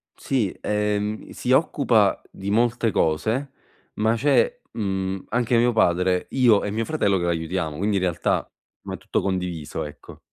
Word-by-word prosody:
Sì, 120 -9 -1
ehm, 105 0 -1
si - - -3
occupa - - +3
di 95 +1 -5
molte 115 0 +2
cose, 110 - 0 0.4
ma 110 +1 +2
c'è, 145 - +2
mhmm, 95 -3 -2
anche 120 +1 +1
mio 120 +1 +4
padre, 90 -3 +2
io 120 -6 +4
e 105 - -2
mio 110 +1 -1
fratello 100 -11 +1
che 85 - -2
la 85 - +2
aiutiamo, 80 -2 -2
quindi 100 +3 0
in 95 - -1
realtà, 90 -3 0 0.3
mhmm, - - -6
è - - -4
tutto - - -2
condiviso, 90 -5 -3
ecco. 75 - -11
105 Hz, 165 wpm, -23 LUFS, 90-115 Hz, 0.4 s, mio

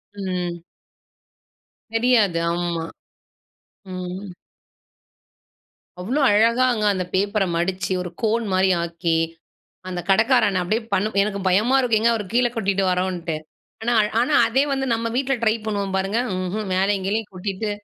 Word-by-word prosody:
ம். 180 -3 -4 1.3
தெரியாது 225 -7 +3
ஆமா. 170 -1 -2 1.1
ம். 185 +2 -6 1.7
அவ்வளோ 245 +11 -1
அழகாங்க 230 +2 +3
அந்த 185 -2 -1
பேப்பர 200 +1 +1
மடிச்சு, 185 +2 -1
ஒரு 180 - -5
கோன் 225 0 +1
மாரி 190 +1 +3
ஆக்கி. 170 0 -1 0.7
அந்த 180 -1 -3
கடைக்காரண்ண 220 -3 +3
அப்படியே 215 +6 -1
பண்ணும் 205 +2 0
எனக்கு 200 -1 -2
பயமா 215 +8 +3
இருக்கும் 235 -4 +2
எங்க 235 +1 +4
அவரு 215 -3 -3
கீழ 245 +1 +3
கொட்டிடுவரோன்ட்டு. 185 -4 0 0.5
ஆனா-ஆனா 230 +4 +2
அதே 265 +4 +2
வந்து 270 0 -1
நம்ம 230 0 -2
வீட்ல 270 0 +1
ட்ரை 220 0 +3
பண்ணுவோம் 200 -2 -2
பாருங்க 195 +4 0 0.2
ம்ஹ்ம் 190 +3 -3
மேலயும் 195 0 +1
கீழயும் 215 +1 -2
கொட்டிட்டு. 195 +3 -3
200 Hz, 120 wpm, -22 LUFS, 185-225 Hz, 1.7 s, எங்க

